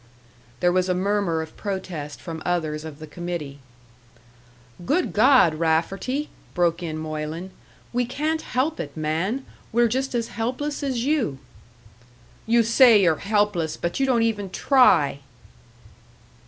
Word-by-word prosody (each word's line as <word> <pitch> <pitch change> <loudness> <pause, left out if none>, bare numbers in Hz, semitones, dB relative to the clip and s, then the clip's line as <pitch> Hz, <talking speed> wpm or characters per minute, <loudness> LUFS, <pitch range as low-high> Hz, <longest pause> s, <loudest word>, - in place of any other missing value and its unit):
There 175 - +4
was 185 +1 +1
a 180 - +2
murmur 190 -4 0
of 160 - -12
protest 185 -7 -5
from 165 -2 -7
others 155 -4 -1
of 155 -3 -8
the 155 - -9
committee. 155 -3 -6 1.2
"Good 310 - 0
God, 250 - +5
Rafferty!" 170 - -1 0.3
broke 175 -1 +1
in 160 -2 -4
Moylan. 155 +3 -5 0.4
"We 245 0 +1
can't 310 +5 -1
help 295 +6 -1
it, - - -6
man 165 - -1 0.3
we're 235 +1 +4
just 260 +3 -2
as 230 -1 -1
helpless 260 +6 -3
as 260 -4 -1
you!" 270 - 0 1.1
"You 235 +1 +4
say 230 -1 +6
you're 165 -3 +4
helpless 205 -5 0
but 170 +7 -3
you 270 - +2
don't 240 -3 +3
even 210 -4 -1
try!" 180 - +4
190 Hz, 135 wpm, -24 LUFS, 160-245 Hz, 1.2 s, say